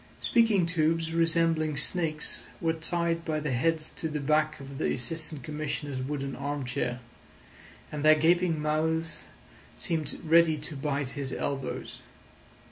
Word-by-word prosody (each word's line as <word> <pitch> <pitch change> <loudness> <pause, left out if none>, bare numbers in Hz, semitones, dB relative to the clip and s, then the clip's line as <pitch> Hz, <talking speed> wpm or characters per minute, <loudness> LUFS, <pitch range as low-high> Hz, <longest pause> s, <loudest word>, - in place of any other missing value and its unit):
Speaking 225 -6 +3
tubes 165 -1 +1
resembling 165 -2 +2
snakes 160 -4 -1
were 165 -1 +1
tied 165 +1 0
by 155 -2 -1
the 150 -2 -2
heads 155 +5 +1
to 160 - -1
the 150 0 -2
back 155 +2 +1
of 135 0 -8
the - - +1
Assistant 155 +2 -3
Commissioner's 145 -2 -3
wooden 140 0 -3
arm 140 0 -3
chair, 125 -1 -2 0.9
and 150 -1 -4
their 155 0 +8
gaping 165 +1 +3
mouths 155 +1 -1 0.5
seemed 160 -3 -1
ready 165 -1 +5
to 150 +1 -5
bite 140 -1 -1
his 135 -1 -4
elbows. 135 -1 -3
155 Hz, 135 wpm, -29 LUFS, 145-165 Hz, 0.9 s, their